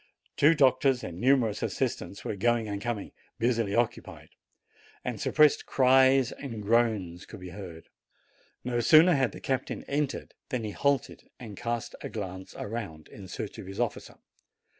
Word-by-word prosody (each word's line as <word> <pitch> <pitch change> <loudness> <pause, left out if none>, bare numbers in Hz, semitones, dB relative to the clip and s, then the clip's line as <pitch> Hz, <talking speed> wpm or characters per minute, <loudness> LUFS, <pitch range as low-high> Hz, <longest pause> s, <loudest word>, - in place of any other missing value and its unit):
Two 155 +3 +5
doctors 135 -2 +3
and 85 0 -6
numerous 125 -5 +3
assistants 100 - -3
were - - -2
going 115 +2 +1
and 100 -1 -4
coming, 120 -3 -3 0.3
busily 115 -3 0
occupied; 120 0 -2 0.8
and - - -3
suppressed 150 -1 +3
cries 130 0 +4
and 115 -7 -7
groans 105 -6 +1
could 110 - -10
be 90 0 -8
heard. 90 -4 -9 0.8
No 120 -1 -1
sooner 160 +8 +7
had 135 -7 +2
the - - -10
captain 130 -1 -3
entered 145 -1 -2 0.2
than 125 -5 -2
he 105 - -3
halted 140 +3 -1
and 110 -5 -9
cast 120 +2 -3
a - - -5
glance 95 -3 -7
around, 100 -8 -6
in 100 -3 -11
search 100 +2 -6
of 95 - -8
his 95 +1 -8
officer. 120 -3 -3
115 Hz, 155 wpm, -28 LUFS, 100-130 Hz, 0.8 s, sooner